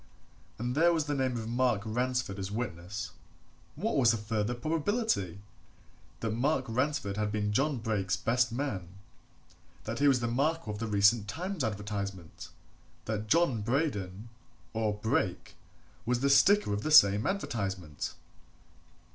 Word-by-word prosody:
And 120 +2 -2
there 165 +5 +4
was 160 -3 0
the 145 - -1
name 130 -3 0
of 110 -1 -5
Mark 120 -3 +1
Ransford 120 -2 -1
as 95 0 -4
witness. 100 -3 -4 0.6
What 205 +3 -1
was 125 -4 +5
the 115 - +3
further 105 +2 -2
probability? 155 - -1 0.8
That 115 - -1
Mark 130 +4 +1
Ransford 130 -3 -1
had 105 -1 -1
been 105 0 -1
John 135 +4 +1
Brake's 110 -4 -1
best 120 +1 +1
man; 115 -8 -3 1.0
that 115 +3 -4
he 145 - +4
was 135 -3 +4
the 120 - -1
Marco 140 +1 0
of 105 - -6
the 115 - -2
recent 105 +1 +3
Times 175 - -3
advertisement; 100 -5 -5 0.6
that 110 0 -3
John 150 -5 +3
Braden, 110 - -2 0.4
or 110 -2 0
Brake, 110 +2 -1 0.5
was 120 +1 0
the 140 0 +3
Sticker 175 - +5
of 100 - -1
the 155 - -2
same 105 -8 +7
advertisement. 95 - -3
115 Hz, 145 wpm, -30 LUFS, 105-140 Hz, 1.0 s, same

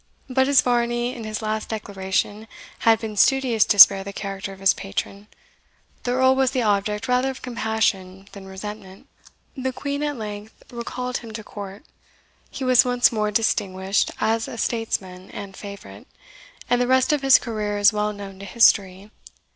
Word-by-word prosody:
But 265 0 +1
as 280 -1 +5
Varney 240 0 0
in 230 -3 -8
his 215 0 -5
last 215 0 -3
declaration 205 0 -3 0.3
had 225 -1 +4
been 220 -2 -6
studious 250 0 +3
to 205 - +1
spare 195 0 +9
the 200 - -7
character 195 0 -6
of 195 - -12
his 195 0 +4
patron, 200 +1 -6 0.7
the 245 - -2
Earl 260 +1 +4
was 265 -1 +2
the 255 -2 -1
object 210 0 0
rather 250 +1 +1
of 265 - -8
compassion 215 -5 -2
than 195 -1 -11
resentment. 190 0 -9 0.5
The 260 -1 -3
Queen 280 +3 -4
at 295 -2 -2
length 210 -1 -8
recalled 250 +1 -4
him 230 -2 -10
to 220 0 -7
court; 200 +4 -9 0.6
he 270 - -7
was 255 -1 +5
once 245 -1 +3
more 215 -2 -1
distinguished 195 -3 0
as 225 +1 0
a - - -8
statesman 190 -6 -3
and 200 -1 -9
favourite; 200 +1 -11 0.6
and 245 0 +2
the 245 - +1
rest 260 +4 +3
of 295 - 0
his 270 -1 +7
career 210 -3 -3
is 205 +1 +5
well 210 0 -1
known 200 -2 -9
to 200 - -8
history. 200 -2 +2
215 Hz, 170 wpm, -23 LUFS, 200-245 Hz, 0.7 s, spare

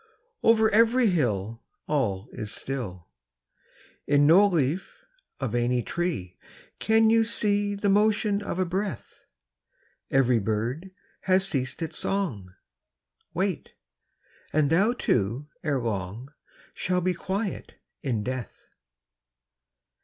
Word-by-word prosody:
I - - 0
Over 220 -1 +6
every 230 +1 +4
hill 115 - -1 0.3
All 115 -9 -1
is 105 -1 -6
still; 105 - -5 1.0
In 145 0 +4
no 185 +7 +7
leaf 175 - -2 0.3
of 130 -5 -3
any 120 0 +1
tree 165 - -3 0.4
Can 220 0 +4
you 225 0 +5
see 205 -2 0
The 200 +1 -1
motion 210 0 +2
of 200 - -4
a 185 - +1
breath. 185 - -4 0.9
Every 125 -3 +3
bird 115 - -2 0.4
has 190 0 +3
ceased 135 -2 -2
its 160 -1 -5
song, 135 - -2 0.8
Wait; 190 -1 -2 0.8
and 150 -1 +2
thou 200 +8 +4
too, 120 - 0 0.2
ere 145 -5 0
long, 115 +4 -4 0.4
Shall 180 0 -1
be 180 +1 +1
quiet 190 +3 -4 0.3
in 120 -8 -1
death. 125 -2 -6
155 Hz, 115 wpm, -26 LUFS, 120-200 Hz, 1.0 s, no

